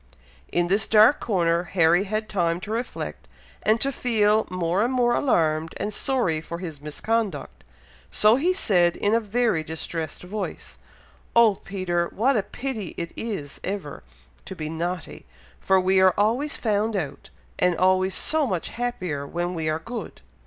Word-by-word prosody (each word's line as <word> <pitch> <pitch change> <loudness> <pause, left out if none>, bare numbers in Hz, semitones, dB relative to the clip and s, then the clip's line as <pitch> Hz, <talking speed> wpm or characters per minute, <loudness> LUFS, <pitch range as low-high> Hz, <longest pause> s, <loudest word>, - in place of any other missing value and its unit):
In 175 0 +2
this 200 +5 +1
dark 220 +6 +6
corner, 170 -5 +1
Harry 175 +1 +3
had 215 +2 -2
time 170 -4 0
to 205 - -6
reflect 235 +3 -4 0.3
and 220 +2 +2
to 275 - +1
feel 220 -4 +2
more 180 +2 0
and 240 - 0
more 245 -2 +2
alarmed 160 - +1
and 210 - -3
sorry 200 -12 0
for 170 +1 -6
his 165 -5 -7
misconduct, 215 +8 -3 0.5
so 215 +2 +4
he 325 +8 +2
said, 180 - +2
in 205 - 0
a 230 - +4
very 220 -5 0
distressed 160 +1 -5
voice, 205 +4 -6 0.6
"Oh, 230 -3 +6
Peter! 175 -3 -1
what 260 +6 +2
a 215 - +3
pity 215 -1 -5
it 170 0 -4
is 195 -11 -5
ever 190 -7 -5 0.4
to 190 - -7
be 155 -3 -5
naughty, 175 +3 -5 0.3
for 190 0 +3
we 190 +1 +3
are 185 -1 +5
always 235 +9 +1
found 215 0 0
out, 160 -8 -4 0.3
and 180 -1 +3
always 185 +1 +2
so 310 -3 +1
much 185 -6 -2
happier 180 -13 -3
when 175 +3 -2
we 160 -2 -2
are 155 - 0
good!" 225 +4 -7
190 Hz, 160 wpm, -24 LUFS, 170-225 Hz, 0.6 s, dark